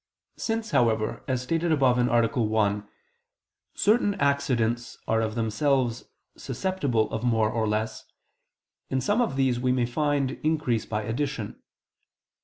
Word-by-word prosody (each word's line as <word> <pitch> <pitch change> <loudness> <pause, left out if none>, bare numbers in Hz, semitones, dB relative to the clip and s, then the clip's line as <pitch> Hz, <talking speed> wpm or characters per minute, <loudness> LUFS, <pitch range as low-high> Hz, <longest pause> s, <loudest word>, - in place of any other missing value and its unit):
Since, 225 -1 -2
however, 110 -2 +1
as 130 -2 -1
stated 165 +5 0
above 130 -5 +3
(A. 120 -1 +3
1), 105 -2 +1 0.9
certain 205 -1 +3
accidents 125 - 0
are 110 0 +2
of 110 -1 -2
themselves 120 +2 0 0.3
susceptible 140 - -1
of 110 - -3
more 110 -3 +2
or 110 -1 0
less, 110 +1 -2 0.8
in 130 - 0
some 205 - +1
of 230 - 0
these 130 -3 +1
we 125 0 +1
may 125 -1 +2
find 140 +1 0
increase 150 -8 0
by 110 0 -2
addition. 120 -1 -3
125 Hz, 130 wpm, -26 LUFS, 110-145 Hz, 0.9 s, above